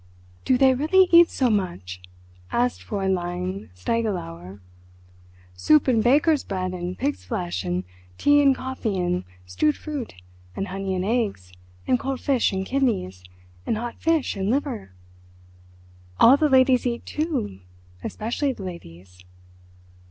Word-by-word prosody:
"Do 255 - +3
they 265 0 +5
really 320 +8 +4
eat 340 0 +8
so 255 -3 +1
much?" 170 - -3 0.5
asked 245 +1 0
Fräulein 185 -1 -3
Stiegelauer. 95 - -3 0.9
"Soup 95 +13 +3
and 230 -4 +3
baker's 290 +4 +3
bread 185 -2 -3
and 180 0 -5
pig's 95 -11 -2
flesh, 90 0 -3
and 90 0 -2 0.3
tea 290 0 +4
and 275 -2 +4
coffee 260 -6 -3
and 180 0 -1 0.2
stewed 90 +12 0
fruit, 290 - -6 0.4
and 195 - -3
honey 195 0 -3
and 185 0 -2
eggs, 205 - -2 0.3
and 250 - +2
cold 270 -1 -3
fish 265 -4 +1
and 190 0 -2
kidneys, 205 - -1 0.4
and 220 - 0
hot 235 +1 -5
fish 325 -4 +1
and 195 0 -2
liver? 250 - -2 1.3
All 245 +4 +8
the 300 +1 +2
ladies 260 -1 +4
eat, 235 -1 -3
too, 300 - -3 0.4
especially 250 +6 -2
the 200 - -9
ladies." 90 - -10
205 Hz, 135 wpm, -24 LUFS, 170-260 Hz, 1.3 s, eat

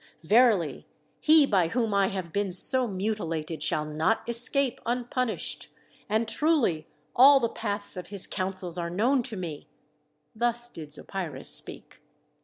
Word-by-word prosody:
Verily 210 - +2 0.3
he 310 -1 +5
by 190 -9 +1
whom 225 +2 -2
I 200 -1 +2
have 185 -4 -6
been 200 -1 -1
so 250 +8 +4
mutilated 180 -6 -4
shall 150 - 0
not 155 +11 -1
escape 245 +2 +2
unpunished. 245 0 -3 0.4
And 220 +2 0
truly 245 - 0 0.3
all 275 +2 +7
the 235 - 0
paths 205 -3 -3
of 180 - -8
his 200 -2 0
counsels 185 -2 -3
are 170 0 -3
known 240 +10 +1
to 235 -3 -4
me." 165 -5 -7 0.7
Thus 240 +1 +1
did 155 -8 -10
Zopyrus 175 0 -4
speak. - - -4
205 Hz, 140 wpm, -26 LUFS, 175-240 Hz, 0.7 s, all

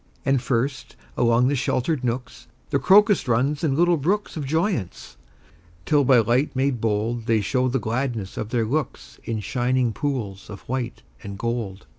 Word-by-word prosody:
And 135 -2 +2
first, 130 +2 -2 0.2
along 120 +1 +3
the 145 - +1
sheltered 130 +2 -1
nooks, 125 0 -4 0.2
The - - +2
crocus 205 -3 +5
runs 135 +6 +1
in 145 -4 +1
little 175 +2 +3
brooks 195 +9 -1
Of 150 -4 -4
joyance, 160 - -2 0.7
till 145 -2 +3
by 130 -1 +5
light 120 +6 +2
made 130 -3 0
bold 115 +2 -1
They 115 -1 +3
show 130 +5 0
the 130 +1 0
gladness 115 -3 -3
of 110 - -4
their 115 -2 0
looks 145 +7 -4
In 110 -2 -3
shining 125 +2 0
pools 110 -8 -4
of 100 -2 -9
white 125 -1 -4 0.2
and 100 -1 -7
gold. 115 -4 -4
125 Hz, 165 wpm, -23 LUFS, 115-140 Hz, 0.7 s, crocus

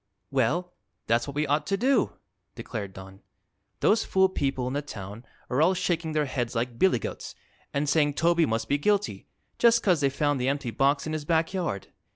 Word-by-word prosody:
"Well, 155 +8 0 0.3
that's 115 +3 +1
what 140 - -6
we 150 +1 +1
ought 145 +1 0
to 195 - +1
do," 265 +6 +2 0.4
declared 100 -4 -5
Don. 95 +1 -12 0.6
"Those 220 +1 +4
fool 190 0 +3
people 135 -7 -1
in 130 - -3
the 145 - -1
town 105 -5 -8 0.2
are 130 +4 0
all 180 +4 +4
shaking 165 -3 -1
their 155 -1 +1
heads 125 -3 -3
like 115 0 -2
billygoats 180 - 0 0.4
and 140 +1 -1
saying 145 0 +2
Toby 170 +1 +3
must 115 0 -1
be 145 +3 +1
guilty, 205 +5 0 0.3
just 235 0 +5
'cause 180 -6 +3
they 140 - +3
found 145 0 0
the 130 - +1
empty 140 -4 -2
box 140 +3 +2
in 155 - -3
his 155 -1 -3
back 160 +3 +1
yard. 170 - -3
145 Hz, 195 wpm, -27 LUFS, 125-170 Hz, 0.6 s, just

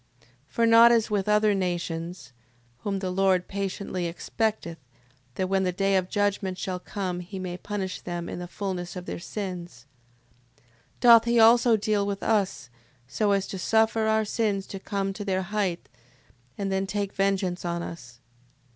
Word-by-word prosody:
6:14. 115 - -28 0.2
For, 230 - +1
not 230 +1 +8
as 225 -2 +2
with 205 -1 0
other 210 0 +4
nations, 175 -4 -3 0.5
(whom 200 +7 -2
the 190 -1 -3
Lord 185 -1 +2
patiently 195 -2 -3
expecteth, 170 0 -3 0.6
that 185 - -1
when 190 0 +1
the 185 -1 +1
day 195 +2 +1
of 185 -1 +1
judgment 205 -3 0
shall 185 -1 -3
come, 185 -2 -4
he 180 +3 -8
may 185 -1 -4
punish 190 -1 -4
them 175 -1 -5
in - - -5
the 175 - -6
fulness 180 -2 -4
of 180 -1 -6
their - - -5
sins:) 175 - -6 0.7
6:15. 130 - -32 0.4
Doth 235 -2 +8
he 235 0 +3
also 230 0 +6
deal 205 -1 0
with 200 -1 -3
us, 200 - 0 0.4
so 205 +10 0
as 195 -1 +2
to 190 - -6
suffer 220 +2 +2
our 220 0 +2
sins 205 -2 -1
to 195 - -7
come 195 0 -2
to 205 - -6
their 190 -1 -1
height, 190 -3 -2 0.7
and 195 -1 -2
then 190 0 0
take 200 0 -2
vengeance 195 -2 0
on 170 -1 -2
us. 125 -9 -9
195 Hz, 175 wpm, -26 LUFS, 180-210 Hz, 0.7 s, not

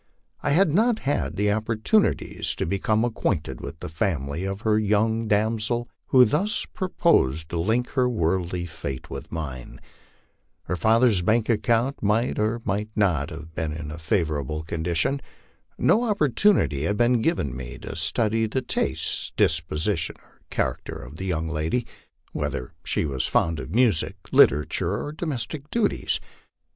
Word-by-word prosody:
I - - 0
had 160 +1 +4
not 225 +5 +3
had 140 - -2
opportunities 110 - +1
to - - -2
become 105 +5 +1
acquainted 80 - -2
with 80 - -8
the - - -4
family 80 0 -2
of 95 +1 -4
the 110 - +3
young 110 +2 +1
damsel 110 +3 0 0.2
who 130 -1 +7
thus 180 - 0
proposed 80 - +1
to 85 - -2
link 115 +8 +1
her 125 -2 +2
worldly 90 -4 0
fate 70 -5 -6
with - - -7
mine. 70 -7 -6 0.8
Her 90 - -2
father's 110 +1 +4
bank 110 +5 +2
account 120 +4 +1
might 110 +4 +1
or 110 +2 0
might 105 +2 -1
not 90 -9 +2 0.3
be - - -3
in 75 -1 -4
a 80 - -7
favorable 80 - -1
condition. 85 - -1 0.6
No 235 +3 +3
op 210 -3 0
portunity 125 - +3
had 105 - 0
been 120 0 +3
given 110 - 0
me 65 -2 -7
to - - -6
study 110 +7 +1
the 130 +4 -2
tastes, - - -2
disposition, 80 +3 +1
or - - -27
character - - -2
of 70 +3 -9
the 95 - -5
young 80 -3 -1
lady 80 +10 -1 0.5
whether 60 - -3
she - - 0
was 70 -3 -1
fond 80 -3 +1
of 80 - -6
music, 115 -10 +2 0.2
literature, 80 +6 +3
or 145 - -4
domestic 150 -2 -4
duties. 230 -3 0
105 Hz, 150 wpm, -25 LUFS, 80-120 Hz, 0.8 s, who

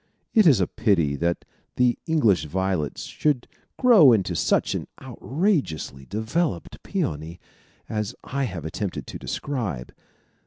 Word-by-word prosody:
It 215 -5 +6
is 135 -9 +6
a 95 - +3
pity 85 - +1
that 85 +2 -1 0.3
the 125 -1 +3
English 110 - +3
violet 95 -1 -1
should 145 -5 -1 0.3
grow 220 - +7
into 95 -5 0
such 85 - +1
an - - -4
outrageously 130 - -2
developed 110 - -2
peony 80 +4 -3 0.5
as 105 -2 -3
I 140 +1 -2
have 90 - -6
attempted 95 +4 -4
to - - -8
describe. 110 - -4
105 Hz, 125 wpm, -24 LUFS, 85-140 Hz, 0.5 s, grow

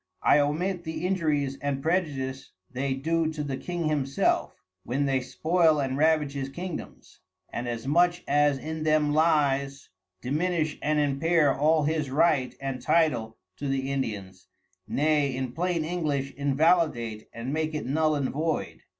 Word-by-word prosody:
I 150 - +5
omit 170 +5 0
the 160 +2 -4
injuries 150 -7 0
and 140 -1 -1
prejudice 140 -6 -2 0.2
they 130 +1 -1
do 160 +3 0
to 150 -1 -3
the 140 -2 -3
King 175 +3 -3
himself, 140 -3 0 0.3
when 135 +4 -1
they 135 -1 +1
spoil 160 +3 +2
and 135 -2 -1
ravage 150 -1 +2
his 135 -1 -4
Kingdoms, 175 +4 -8 0.3
and 120 +1 -3
as 115 -1 -4
much 175 +4 +2
as 145 0 +3
in 160 +3 -5
them 155 -1 +2
lies, 140 -3 +1 0.3
diminish 155 - -1
and 150 0 +1
impair 145 +1 +2
all 155 +2 +3
his 155 -1 0
Right 135 -3 +2
and 135 -2 -4
Title 150 -9 +1 0.2
to 145 - -4
the 135 0 -1
Indians, 100 -8 -4 0.4
nay 145 -2 +1
in 130 -1 -3
plain 170 +2 -1
English 150 -5 -2
invalidate 140 -6 +1
and 120 +4 -5
make 155 0 -1
it 150 - -3
null 155 +3 +1
and 140 -3 -1
void. 155 +2 -2
145 Hz, 150 wpm, -27 LUFS, 135-160 Hz, 0.4 s, I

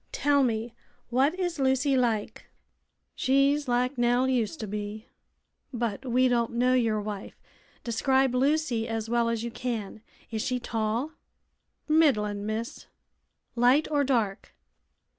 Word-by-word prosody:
Tell 285 -1 +2
me, 230 -2 -1 0.4
what 275 +9 +2
is 350 -4 -2
Lucy 265 +1 +2
like?" 225 -4 -1 0.7
"She's 275 +2 +2
like 250 +1 0
Nell 245 +2 +3
used 255 +3 -1
to 215 - -4
be." 210 +2 -5 0.7
"But 235 0 -3
we 255 +1 +3
don't 240 -1 0
know 250 +2 +2
your 225 -4 +2
wife. 205 -1 -7 0.4
Describe 265 +2 +1
Lucy 260 -3 +1
as 225 0 -4
well 235 -1 +2
as 230 -1 -2
you 235 - -4
can. 225 -4 -4 0.3
Is 220 -1 -2
she 250 0 -1
tall?" 230 +5 -2 0.8
"Middlin', 210 -10 +2
miss." 220 +2 -5 0.7
"Light 250 +5 +4
or 290 -1 +2
dark?" 230 -8 -1
245 Hz, 130 wpm, -27 LUFS, 225-265 Hz, 0.8 s, Light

